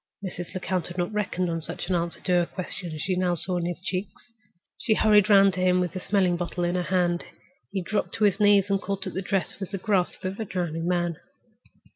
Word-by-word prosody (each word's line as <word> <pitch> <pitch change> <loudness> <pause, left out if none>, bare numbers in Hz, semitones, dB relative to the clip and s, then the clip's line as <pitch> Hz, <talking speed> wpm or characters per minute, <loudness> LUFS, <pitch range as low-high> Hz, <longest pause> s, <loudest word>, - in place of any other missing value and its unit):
Mrs. 175 -1 -6
Lecount 185 -1 -2
had 175 - -9
not 175 +4 -1
reckoned 185 -3 -1
on 165 -1 -2
such 165 +2 -4
an 185 - 0
answer 170 -1 -1
to 185 - -2
her 175 -1 +4
question 185 -1 -6
as 155 -1 -5
she 185 - 0
now 180 -1 +1
saw 180 +2 +1
in 175 -1 -1
his 175 0 -4
cheeks. 190 +4 -5 0.5
She 220 - +2
hurried 210 -1 +5
round 195 -1 +7
to 185 - -4
him, 180 0 +3
with 180 -2 0
the 185 - -5
smelling 185 -2 +1
bottle 175 0 -3
in 175 0 +1
her 180 - 0
hand. 175 -1 +1 0.5
He 195 -2 -2
dropped 205 +3 -1
to 215 - -1
his 205 -1 +3
knees 205 -1 +5
and 195 0 +2
caught 195 -1 -3
at - - -5
her 190 - -2
dress 195 -1 -1
with 195 - -5
the 195 - -3
grasp 185 -2 0
of 190 +3 -3
a 220 - -2
drowning 170 -3 -3
man. 175 -2 0
185 Hz, 240 wpm, -26 LUFS, 175-195 Hz, 0.5 s, round